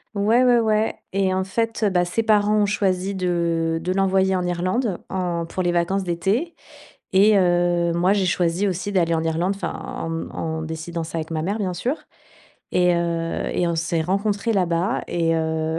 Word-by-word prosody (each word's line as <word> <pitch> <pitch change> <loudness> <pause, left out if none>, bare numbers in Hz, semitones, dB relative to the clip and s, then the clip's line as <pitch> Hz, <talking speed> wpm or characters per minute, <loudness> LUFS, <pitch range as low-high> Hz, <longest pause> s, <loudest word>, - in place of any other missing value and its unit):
Ouais, 220 +5 +3
ouais, 245 -1 +5
ouais 220 -1 +1 0.2
et 190 -1 +1
en 190 - 0
fait 225 +3 -2
heu, 210 - +4
bah 180 -1 +2
ses 205 +6 -1
parents 210 -1 +3
ont - - +4
choisi 195 -1 0
de 170 -3 0
de 180 - -1
l'envoyer 190 0 +2
en 180 -1 -1
Irlande. 185 +4 -1
En 175 -3 -2
pour 185 - -3
les 175 - +1
vacances 175 +3 0
d'été 195 - -1 0.6
et 205 +2 +6
heu, 175 -1 +2
moi 180 +3 +3
j'ai 200 -2 +1
choisi 175 +2 +1
aussi 190 +2 -3
d'aller 170 -3 +2
en 160 - 0
Irlande, 165 +4 0
enfin 175 -4 -3
en - - -6
m 165 0 -4
en 160 -1 -3
décidant 160 +1 -5
ça 165 - -6
avec 160 0 -5
ma 160 -1 -2
mère, 200 +5 -1
bien 190 -4 -1
sûr 255 - -1 0.8
et 180 -1 +3
heu, 170 -1 -2
et 175 - 0
on 170 - -1
s'est 165 0 0
rencontrées 200 +5 0
là 190 -4 +2
bas 175 +7 0
et 165 -1 +1
heu, 160 0 -1
180 Hz, 200 wpm, -22 LUFS, 170-200 Hz, 0.8 s, et